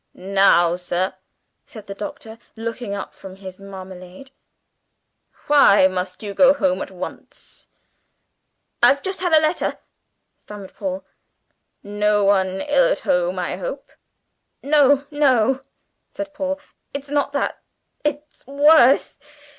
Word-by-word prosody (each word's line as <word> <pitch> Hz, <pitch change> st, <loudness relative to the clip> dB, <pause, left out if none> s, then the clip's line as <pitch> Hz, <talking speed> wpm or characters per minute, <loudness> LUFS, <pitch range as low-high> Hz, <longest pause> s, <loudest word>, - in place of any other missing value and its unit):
"Now, 185 Hz, -2 st, +3 dB
sir," 180 Hz, +1 st, -2 dB, 0.5 s
said 215 Hz, -4 st, -11 dB
the 200 Hz, -, -7 dB
Doctor, 220 Hz, +2 st, -8 dB, 0.2 s
looking 225 Hz, -2 st, -5 dB
up 200 Hz, -, -7 dB
from 190 Hz, -1 st, -11 dB
his 190 Hz, -1 st, -11 dB
marmalade, 190 Hz, +4 st, -11 dB, 1.1 s
"why 280 Hz, -10 st, +6 dB
must 185 Hz, +1 st, -5 dB
you 205 Hz, -1 st, -5 dB
go 275 Hz, +6 st, +5 dB
home 280 Hz, -1 st, 0 dB
at -, -, -5 dB
once?" -, -, -10 dB, 1.1 s
"I've 280 Hz, -, +4 dB
just 380 Hz, 0 st, -2 dB
had 355 Hz, -1 st, -1 dB
a 315 Hz, -, +7 dB
letter," 310 Hz, +2 st, -1 dB, 0.6 s
stammered 205 Hz, -2 st, -11 dB
Paul. 280 Hz, -1 st, -5 dB, 0.8 s
"No 205 Hz, 0 st, +1 dB
one 190 Hz, -1 st, +1 dB
ill 295 Hz, +13 st, +3 dB
at -, -, -2 dB
home, -, -, 0 dB
I -, -, -3 dB
hope?" -, -, -7 dB, 0.7 s
"No, 285 Hz, -1 st, +4 dB
no," 270 Hz, -3 st, +2 dB, 0.5 s
said 300 Hz, -1 st, -7 dB
Paul. 285 Hz, -1 st, -3 dB, 0.4 s
"It's 280 Hz, 0 st, -6 dB
not 285 Hz, -1 st, 0 dB
that; 280 Hz, -, -2 dB, 0.4 s
it's 295 Hz, 0 st, -4 dB
worse! 285 Hz, -1 st, +4 dB
240 Hz, 125 wpm, -21 LUFS, 195-290 Hz, 1.1 s, a